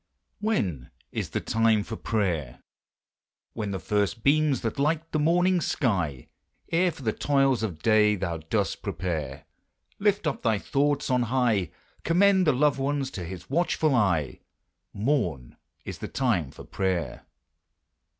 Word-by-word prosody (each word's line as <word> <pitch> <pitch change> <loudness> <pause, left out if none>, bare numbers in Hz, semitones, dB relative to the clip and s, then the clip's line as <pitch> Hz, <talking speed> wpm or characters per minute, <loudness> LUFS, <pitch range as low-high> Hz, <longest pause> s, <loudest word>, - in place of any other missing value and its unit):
When 95 - -1 0.2
is - - -3
the - - -2
time 110 -2 +2
for 115 - -6
prayer? 85 - -2 0.9
With 105 -3 -3
the 95 - -2
first 105 +4 -1
beams 150 -1 +3
that 115 +2 -3
light 160 +3 0
the 155 - 0
morning's 175 +3 +2
sky, 85 - -1 0.5
Ere 175 +2 +3
for 145 - -12
the 110 -2 0
toils 135 -4 +2
of 90 -8 -4
day 105 -1 +4
thou 85 -4 -3
dost 95 +6 -2
prepare, 75 -7 -4 0.5
Lift 205 -2 +1
up 150 - -1
thy 110 -3 +2
thoughts 145 +5 0
on 125 -1 +3
high; 120 -7 +1 0.3
Commend 190 +2 +4
the - - +6
loved 140 +1 +2
ones 135 -1 -1
to 95 - -6
his 90 0 -8
watchful 160 0 +1
care: 90 - +1 0.5
Morn 100 - -1 0.3
is - - -6
the - - -5
time 105 - 0
for - - -12
prayer! 90 -8 -3
115 Hz, 145 wpm, -26 LUFS, 95-145 Hz, 0.9 s, the